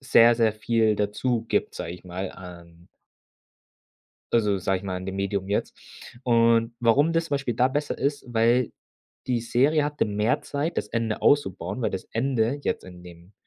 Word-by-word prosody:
sehr, 120 -3 +6
sehr 115 -2 +2
viel 110 -1 +1
dazu 110 +3 -1
gibt, - - 0
sage 85 - -5
ich 90 - -12
mal, 90 +1 -5
an 85 -2 -13 1.5
also 105 -4 +2
sage 95 0 0
ich - - -15
mal, 95 -2 -3
an 90 +1 -6
dem 95 0 -4
Medium 100 0 -2
jetzt. 100 - -2 0.5
Und 115 -1 +3
warum 140 +8 +3
das 165 0 +1
zum 145 - -1
Beispiel 130 -5 -2
da 125 +2 +4
besser 145 +2 -2
ist, 145 +1 -2
weil 120 +1 +2 0.6
die 125 -2 0
Serie 140 +6 +2
hatte 150 0 0
mehr 105 +2 0
Zeit, 145 +4 -3
das 105 - -4
Ende 115 -2 -2
auszubauen, 100 -5 +1
weil - - +1
das 95 - -5
Ende 125 +2 0
jetzt - - -2
in 90 -1 -12
dem 85 +2 -14
115 Hz, 180 wpm, -25 LUFS, 95-125 Hz, 1.5 s, sehr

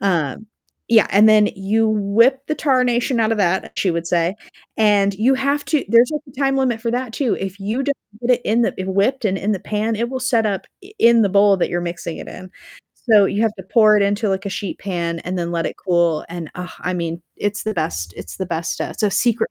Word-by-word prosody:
um, 175 0 -1 0.4
yeah, 225 -3 +5
and 210 +3 +6
then 215 -1 +5
you 215 +3 +1
"whip 220 +5 +3
the 305 - 0
tarnation 250 -3 +1
outta 225 0 +1
that," 190 -2 0
she 190 - +1
would 170 0 -3
say, 170 +2 0 0.4
and 205 -2 +3
you 240 +7 +2
have 280 +2 -1
to 305 -3 0
there's, 235 +4 +5
like, 300 - -3
a 265 +1 -11
time 270 0 +2
limit 250 -4 0
for 230 0 -2
that, 245 -1 -3
too. 255 -3 -1
If 195 +1 -6
you 220 +7 -2
don't 280 -1 -1 0.2
get 245 - -1
it - - -24
in 230 +3 +2
the - - +2
w 190 0 -5
whipped 225 +6 +1
and 195 -2 0
in 210 +3 -1
the 190 - -3
pan, 215 +2 -2
it 235 +2 -2
will 260 - -3
set 240 -3 +1
up 195 -2 -3 0.2
i 395 - -14
in 235 - +5
the 200 - +2
bowl 200 0 +4
that - - 0
you're 175 - -1
mixing 170 -1 -5
it - - -8
in. 185 0 -10 0.6
So 205 -2 +7
you 205 +3 -1
have 225 - +1
to 190 - -8
pour 215 -2 +6
it 205 - +3
into, 205 +2 0
like, 195 +1 -2
a - - -3
sheet 195 0 -5
pan 170 -3 -3
and 180 +1 -4
then 170 -1 -3
let 165 -1 -1
it - - -4
cool 170 -4 +1
and, 165 -2 -6
uh, 180 0 -6
I 180 - -2
mean, 170 -1 -3 0.2
it's 205 0 -3
the 215 -1 -2
best, 85 - -3
it's - - -9
the 190 - -3
best 165 -1 -3
stuff. - - -4
It's - - -7
a 205 - +2
secret 235 +2 +1
205 Hz, 250 wpm, -19 LUFS, 185-235 Hz, 0.6 s, So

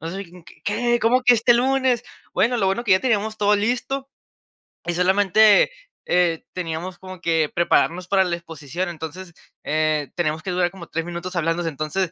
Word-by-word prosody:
No 165 +2 -5
sabía 195 +2 -5
quién. 175 0 -16 0.2
"¿Qué? 240 +3 +1
¿Cómo 250 +3 +3
que 250 -1 +6
este 235 +1 +4
lunes?". 260 -1 +2 0.3
Bueno, 245 +2 +2
lo 195 - +1
bueno 195 +4 0
es - - -19
que 215 - -2
ya 185 - +4
teníamos 220 -2 0
todo 205 0 +3
listo 250 +5 -2 0.8
y 175 - -1
solamente, 200 - +4 0.3
eh, 175 -2 +1
teníamos 175 +1 -5
como 185 -1 -10
que 160 -3 +1
prepararnos 175 +1 +1
para 195 -1 +4
la 175 -1 -1
exposición. 165 +1 -5
Entonces, 170 +2 -8 0.3
eh, 155 -3 0
teníamos 155 -2 -1
que 190 - -3
durar 180 -1 +1
como 180 -3 -11
3 165 +1 -3
minutos 175 +1 -6
hablándose. 165 0 0
Entonces, 155 +4 -2
185 Hz, 185 wpm, -22 LUFS, 165-215 Hz, 0.8 s, que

